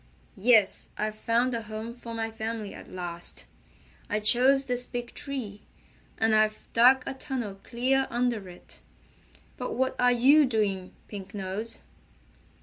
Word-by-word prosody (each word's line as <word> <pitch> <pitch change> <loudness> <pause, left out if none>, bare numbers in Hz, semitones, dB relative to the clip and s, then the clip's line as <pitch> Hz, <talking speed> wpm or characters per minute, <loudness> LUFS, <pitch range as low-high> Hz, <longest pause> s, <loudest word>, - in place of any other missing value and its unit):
"Yes, 215 -3 +3
I've 215 0 -2
found 235 +3 0
a 230 - -2
home 220 +1 -7
for 235 -1 -9
my 225 0 -3
family 220 -1 -5
at - - -12
last. 175 -1 -4 0.6
I 210 - 0
chose 260 +6 +6
this 245 -1 +2
big 240 -1 -5
tree, 235 -8 -3 0.6
and 225 0 +2
I've 215 0 +1
dug 255 +3 +6
a 270 - -4
tunnel 245 -7 -5
clear 265 +3 +1
under 235 -5 -1
it. 175 - -14 0.8
But 250 - -4
what 260 +1 0
are 245 0 +4
you 270 +5 +5
doing, 200 -6 -2
Pink 200 -1 -9
Nose?" 200 +3 -4
230 Hz, 145 wpm, -27 LUFS, 210-250 Hz, 0.8 s, chose